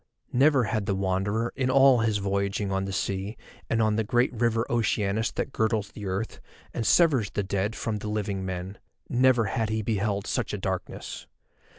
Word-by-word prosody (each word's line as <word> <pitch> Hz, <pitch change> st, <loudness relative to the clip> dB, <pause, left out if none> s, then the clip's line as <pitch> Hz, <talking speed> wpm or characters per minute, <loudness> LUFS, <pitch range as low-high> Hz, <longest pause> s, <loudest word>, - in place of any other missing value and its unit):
Never 135 Hz, 0 st, +4 dB
had 110 Hz, -1 st, -1 dB
the 100 Hz, -, +1 dB
Wanderer 100 Hz, +4 st, -1 dB
in 130 Hz, -2 st, 0 dB
all 135 Hz, -1 st, +6 dB
his 110 Hz, -2 st, +1 dB
voyaging 100 Hz, 0 st, -1 dB
on 95 Hz, 0 st, 0 dB
the 95 Hz, -, -4 dB
sea 100 Hz, +2 st, -2 dB, 0.3 s
and 115 Hz, -1 st, +2 dB
on 110 Hz, -1 st, +2 dB
the 110 Hz, -, +2 dB
great 120 Hz, +4 st, +1 dB
River 115 Hz, 0 st, +1 dB
Oceanus 110 Hz, -2 st, 0 dB
that -, -, -3 dB
girdles 110 Hz, -3 st, 0 dB
the 105 Hz, -2 st, -7 dB
earth, 100 Hz, +4 st, -3 dB, 0.3 s
and 115 Hz, -, -2 dB
severs 140 Hz, -, +4 dB
the 105 Hz, -, -2 dB
dead 100 Hz, +3 st, -1 dB
from 110 Hz, -2 st, -2 dB
the 105 Hz, -, -5 dB
living 100 Hz, -2 st, -2 dB
men—never 110 Hz, +7 st, 0 dB
had 110 Hz, +2 st, -1 dB
he 110 Hz, 0 st, -1 dB
beheld 100 Hz, -2 st, -1 dB
such -, -, -1 dB
a -, -, -3 dB
darkness. -, -, -5 dB
110 Hz, 180 wpm, -27 LUFS, 100-115 Hz, 0.3 s, all